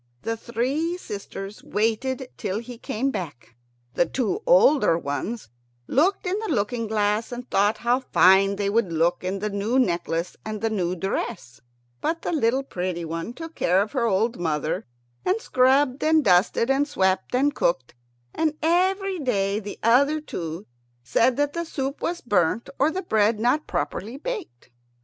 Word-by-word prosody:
The 225 - -1
three 265 +10 -2
sisters 200 - -7
waited 250 +5 -1
till 200 -2 -3
he 235 +1 -8
came 260 +5 -2
back. 145 - -7 0.4
The 175 - +2
two 270 - -1
elder 305 - +5
ones 170 - -4 0.4
looked 360 - +1
in 370 +3 0
the 440 -1 -4
looking 230 -1 -1
glass, 210 +1 0
and 245 +1 -6
thought 205 +2 +3
how 240 +2 +1
fine 195 -5 +4
they 200 0 -1
would 200 -3 +1
look 165 +2 +1
in 185 +2 -2
the 210 +2 -2
new 205 +5 0
necklace 170 -6 0
and 215 -1 -5
the 225 +1 -1
new 180 -4 -1
dress; 185 - -4 0.4
but 330 0 -1
the - - -1
little 265 -4 +1
pretty 180 -7 -4
one 165 +6 -4
took 325 +4 -8
care 180 - +2
of 205 +2 0
her 240 -4 0
old 225 +4 +1
mother, 155 -4 -2 0.4
and 385 +4 +1
scrubbed 260 - +2
and 315 0 +4
dusted 195 +7 +3
and 280 +2 +2
swept 190 -4 0
and 285 +3 +2
cooked, 135 - 0 0.4
and 315 -1 0
every 375 +3 +1
day 200 -7 0
the 205 -1 -7
other 280 +7 +4
two 170 - -6 0.4
said 230 - +2
that 290 0 +1
the 340 - -2
soup 275 -3 -4
was 345 +1 -2
burnt 205 -1 +1
or 285 - +4
the 370 +4 -3
bread 215 -5 +2
not 250 +7 +1
properly 200 - -3
baked. 350 - -6
230 Hz, 165 wpm, -24 LUFS, 190-280 Hz, 0.4 s, elder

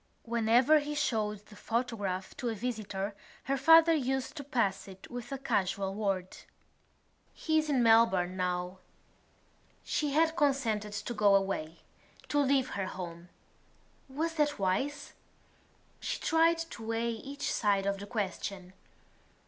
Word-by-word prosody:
Whenever 235 +6 +4
he 295 0 -4
showed 215 -7 -1
the 210 - -15
photograph 210 -6 -3
to 245 - -3
a 225 - -2
visitor 210 -3 -4 0.3
her 275 - 0
father 325 +4 +7
used 265 -2 -1
to 290 - -6
pass 235 -9 -1
it 190 -1 -12
with 245 +1 -7
a 275 - -2
casual 195 -6 -1
word: 195 -3 -2 1.0
"He 315 -1 +1
is 310 -1 -2
in 260 -4 +2
Melbourne 225 -6 +4
now." 180 0 -2 1.0
She 295 -2 -1
had 320 +2 +3
consented 235 -9 0
to 205 +4 -4
go 205 -3 +4
away, 185 -5 -1 0.5
to 290 - +2
leave 275 -2 +2
her 195 -2 -3
home. 175 -2 -7 0.8
Was 320 +5 -2
that 295 -1 +1
wise? 265 +10 -1 0.9
She - - -3
tried 330 +1 +3
to 330 -9 -7
weigh 230 +1 0
each 275 +6 -4
side 200 -3 +1
of 200 0 -1
the 200 - -8
question. 195 -3 -4
225 Hz, 140 wpm, -31 LUFS, 195-280 Hz, 1.0 s, father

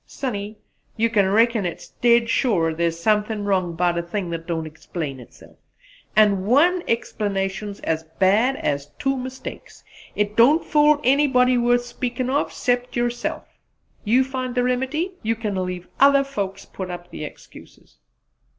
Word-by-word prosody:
"Sonny, 210 -5 -5 0.4
you 230 +1 +1
kin 200 -4 +3
reckon 225 +1 +3
it 175 -2 -6
dead 235 -1 +4
sure 185 -10 +1
thar's 165 0 -1
something 210 +2 +1
wrong 185 -4 0
'bout 175 0 +1
a - - 0
thing 175 +1 -4
that 165 0 -5
don't 165 -2 -2
explain 155 -2 -6
itself; 125 - -16 0.6
an' 205 -3 +4
one 315 - +3
explanation's 200 -3 -2
as 160 0 -1 0.2
bad 215 +8 +3
as 140 - -2
two 270 0 0
mistakes 260 0 -8 0.3
it 210 0 -1
don't 275 +9 +5
fool 300 0 +4
anybody 255 -2 +4
worth 245 0 +2
speaking 245 +1 -3
of, 285 - 0
'cept 245 -1 -1
yerself. 240 0 -2 0.6
You 240 +5 +3
find 255 -1 -4
the 250 - +2
remedy; 265 +8 -1
you 225 +1 0
can 215 -2 -3
leave 180 -1 -5
other 275 0 +6
folks 200 -8 -5
put 190 -1 -7
up 175 0 -8
the - - -7
excuses." 150 - -13
220 Hz, 150 wpm, -22 LUFS, 185-250 Hz, 0.6 s, other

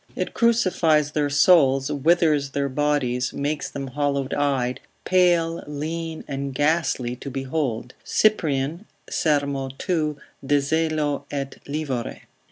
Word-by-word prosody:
It - - -3
crucifies 180 -10 +2
their 150 -1 0
souls, 140 -3 +4
withers 150 -1 +2
their 140 0 -1
bodies, 130 -3 0
makes 145 +1 -2
them 140 -1 -5
hollow 140 0 -1
eyed, 135 -3 0 0.3
pale, 175 -3 +2
lean, 160 +2 -4
and 140 -1 -4
ghastly 145 -5 +1
to 140 - -7
behold, 135 -3 -3
Cyprian, 160 -4 +1 0.3
ser. 150 -3 +2 0.4
2. 155 -5 -1 0.3
de 145 +2 +3
zelo 150 -1 0
et 140 -1 -5
livore. 140 -5 -3
145 Hz, 115 wpm, -23 LUFS, 135-160 Hz, 0.4 s, souls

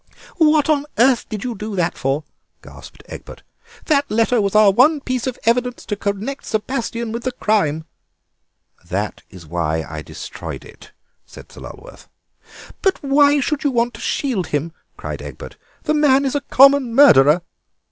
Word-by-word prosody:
"What 310 -3 +3
on 295 -2 +1
earth 245 +2 +3
did 215 -2 -5
you 250 -1 -3
do 215 0 -6
that 175 -2 -1
for?" 135 +3 -2 0.4
gasped - - -14
Egbert. - - -11 0.4
"That 285 -2 +1
letter 230 +2 +2
was 200 0 -2
our 215 -2 +6
one 280 +9 +4
piece 255 -2 -3
of 255 - -4
evidence 245 +1 0
to 205 - -3
connect 205 +7 -4
Sebastien 230 0 -3
with 235 +1 -4
the 255 - -2
crime." 160 -10 0 1.0
"That 95 +5 -4
is 90 -4 -13
why 80 -1 -2
I 80 0 -7
destroyed - - -8
it," - - -16 0.4
said - - -14
Sir - - -13
Lulworth. - - -12 0.7
"But 385 -5 0
why 285 +1 +4
should 300 +3 -2
you 290 - +2
want 240 -1 0
to - - -11
shield 245 - -2
him?" 150 +3 -2 0.3
cried - - -6
Egbert; - - -10 0.3
"the 305 - 0
man 280 -2 +3
is 265 - -1
a 285 - -1
common 275 -3 +4
murderer." 160 - +6
235 Hz, 165 wpm, -19 LUFS, 190-275 Hz, 1.0 s, our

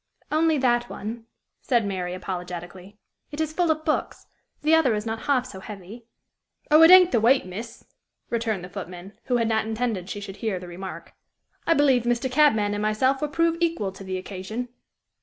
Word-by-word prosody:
"Only 315 0 +3
that 240 -2 +1
one," 225 +2 -7 0.3
said 240 -4 +1
Mary, 180 -2 -3
apologetically. 180 +1 -7 0.3
"It 290 - -8
is 315 -1 -1
full 345 0 +1
of 315 0 0
books. 305 - -2 0.4
The 310 +2 +3
other 315 -8 +4
is 210 +1 -3
not 225 0 -3
half 265 -3 +2
so 195 -7 -9
heavy." 205 +3 -10 0.7
"Oh, 305 +1 +7
it 325 - +9
ain't 365 -1 +8
the 235 - +3
weight, 255 +1 +4
miss!" 220 +6 -8 0.5
returned 225 -5 -1
the 180 - -8
footman, 185 0 -8
who 245 - +1
had 230 -1 +1
not 220 -1 0
intended 220 -5 -2
she 205 - -4
should 200 -1 -8
hear 215 -3 -2
the 180 - -10
remark. 185 +2 -8 0.5
"I 330 - +4
believe 275 -4 +4
Mr. 240 +2 -1
Cabman 220 -8 +3
and 205 - -2
myself 260 +6 +1
will 300 - -1
prove 330 +2 +1
equal 330 - 0
to 195 +1 -11
the 190 -1 -4
occasion." 200 +6 -6
225 Hz, 190 wpm, -25 LUFS, 195-275 Hz, 0.7 s, it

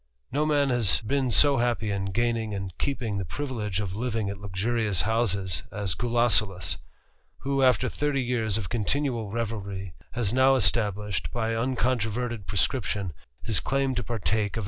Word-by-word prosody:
No 150 +4 +1
man 145 -2 +3
has 120 -8 +4
been 130 +4 0
so 140 +5 +5
happy 120 -3 0
in 100 -1 -1
gaining 115 +1 0
and 95 -3 -5
keeping 115 -7 -1
the - - -1
dvilege 105 - -3
of 95 -3 -3
living 110 -3 -1
at 100 - -8
luxurious 100 +1 0
houses 100 -6 0
as 100 -3 -2
Gulosulus, 115 -4 +2 0.6
who, 135 0 0
ter 125 - -2
thirty 145 0 0
years 115 -4 0
of 105 -5 -3
continual 120 0 -1
revelry, 100 -4 -4 0.2
has 120 -3 0
now 130 +1 +5
established, 105 -3 +1
\f - - -6
uncontroverted 115 -1 -1
prescription, 100 - -1 0.3
his 110 -6 +2
claim 135 +3 0
to 120 - -1
partake 110 -1 -1
of - - +1
115 Hz, 150 wpm, -27 LUFS, 100-125 Hz, 0.6 s, so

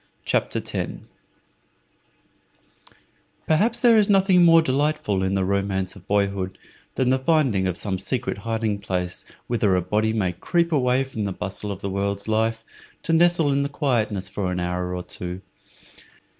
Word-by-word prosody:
CHAPTER - - 0
10 - - -5 2.4
Perhaps 220 +9 +2
there 235 -3 +6
is 210 - +2
nothing 190 -2 +5
more 165 -1 +6
delightful 140 -8 0
in 95 +1 0
the 95 -1 +1
romance 100 -1 -1
of 95 -2 -15
boyhood 100 -2 0 0.4
than 130 -1 +2
the 130 - +2
finding 130 - +2
of 90 -1 -2
some 95 -3 -3
secret 105 +1 -2
hiding 110 -1 -2
place 90 -3 -2 0.2
whither 110 -5 +1
a 90 - +2
body 105 +4 +1
may 105 -5 0
creep 170 - 0
away 130 -3 +2
from 115 -6 -4
the 100 - -2
bustle 100 +2 -4
of 100 -1 -7
the 100 - -2
world's 100 +1 -2
life, 110 +1 0 0.4
to 165 - 0
nestle 170 -3 +4
in 140 0 +1
quietness 110 -10 -1
for 95 -2 -3
an 90 - -2
hour 90 +1 -2
or 90 - -4
two. 90 +1 -7
105 Hz, 155 wpm, -23 LUFS, 95-140 Hz, 2.4 s, there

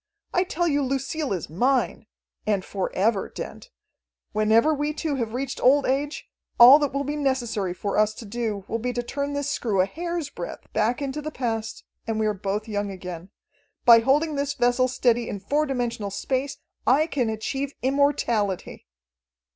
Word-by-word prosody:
I 360 +1 +2
tell 345 -1 -1
you 290 -2 +2
Lucille 275 +2 -2
is 180 -5 -2
mine. 240 - 0 0.4
And 200 -3 +1
for 195 -2 -3
ever, 200 +1 +1
Dent. - - -8 0.6
Whenever 220 +7 +3
we 295 +1 -1
two 315 -2 -2
have 230 -2 -3
reached 270 +1 -3
old 275 +3 +5
age, 285 +3 -1 0.3
all 255 +5 +10
that 290 -2 0
will 280 +1 -1
be 290 +2 -3
necessary 240 -10 -1
for 200 +2 -1
us 215 0 +2
to 230 - -9
do 215 -2 -3
will 230 - -2
be 250 +2 -2
to 240 - -2
turn 280 +3 -3
this 285 0 -2
screw 210 -5 -1
a 185 - +5
hair's 340 - -4
breadth 175 - -8
back 225 +6 +1
into 280 +2 -3
the 305 - -4
past, 225 -6 -3 0.2
and 225 -1 -1
we 220 - +1
are 215 - +1
both 205 +2 -3
young 205 -1 -2
again. 180 -2 -7 0.6
By 235 -2 +9
holding 290 +5 +2
this 285 0 -1
vessel 245 +1 +2
steady 240 -2 +1
in 200 - -4
four 295 +10 0
dimensional 240 -5 -2
space, 260 +7 -2 0.3
I 275 +6 +5
can 265 -8 -1
achieve 270 +6 -3
immortality." 255 - 0
245 Hz, 180 wpm, -25 LUFS, 215-280 Hz, 0.6 s, all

